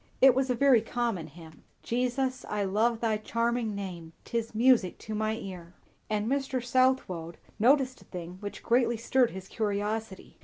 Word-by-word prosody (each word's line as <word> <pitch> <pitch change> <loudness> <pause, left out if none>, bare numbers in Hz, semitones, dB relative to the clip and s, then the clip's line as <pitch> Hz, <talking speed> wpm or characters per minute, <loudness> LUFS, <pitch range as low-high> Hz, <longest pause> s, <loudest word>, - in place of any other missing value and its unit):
It 265 -1 +8
was 265 +1 0
a 250 - +2
very 265 -3 +5
common 225 -7 -2
hymn, 160 +1 -14 0.2
"Jesus, 255 +2 -1
I 210 -1 -1
love 220 +4 +1
thy 220 -2 +1
charming 230 0 -1
name, 175 -5 -6
'Tis 230 -1 -3
music 230 -5 +4
to 220 - -7
my 215 +1 0
ear;" 180 -5 -8 0.3
And 210 -1 0
Mr. 270 0 0
Southwode 245 -10 +1 0.2
noticed 260 +2 +3
a - - -17
thing 180 0 -8
which 205 0 -7
greatly 235 -1 +2
stirred 245 +2 +2
his 190 0 -8
curiosity. 210 -1 -3
225 Hz, 160 wpm, -29 LUFS, 195-250 Hz, 0.3 s, It